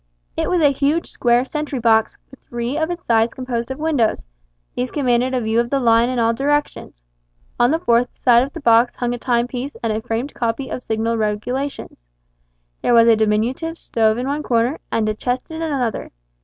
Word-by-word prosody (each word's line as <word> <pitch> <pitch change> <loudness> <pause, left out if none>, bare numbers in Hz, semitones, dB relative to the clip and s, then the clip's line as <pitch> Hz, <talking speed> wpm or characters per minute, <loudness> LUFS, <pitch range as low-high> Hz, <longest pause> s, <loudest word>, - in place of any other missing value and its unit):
It - - -1
was 360 -2 +1
a 290 - +5
huge 285 +4 0
square 240 +1 +2
sentry 300 0 -4
box, 225 -2 +2
with 270 - -15
three 240 +2 -3
of 315 +1 -1
its 350 0 -5
sides 225 0 +2
composed 245 -2 -4
of 265 - -4
windows; 300 -8 0 0.5
these 250 +1 -2
commanded 255 -2 0
a 250 - 0
view 220 +1 +1
of 235 0 0
the 275 - +1
line 230 -1 +3
in 255 - -2
all 230 -1 +2
directions. 280 - -2 0.6
On 240 - +4
the 315 - +2
fourth 240 -6 +1
side 240 -2 +4
of 270 +3 -2
the 330 - -9
box 235 -1 +4
hung 245 -1 -2
a 245 - -5
time 235 -1 +1
piece 255 +3 -6
and 225 -2 0
a 215 - -2
framed 235 +4 -3
copy 235 +3 -2
of - - -4
signal 225 +1 -1
regulations. 215 - -3 0.7
There 240 - +3
was 230 0 +6
a 230 - +6
diminutive 225 +10 0
stove 220 -5 +1
in 250 - -3
one 285 +2 -2
corner, 245 +3 0
and 220 -1 0
a 215 - 0
chest 245 +4 -2
in 320 0 -6
another. 270 -8 -2
245 Hz, 205 wpm, -20 LUFS, 230-275 Hz, 0.7 s, was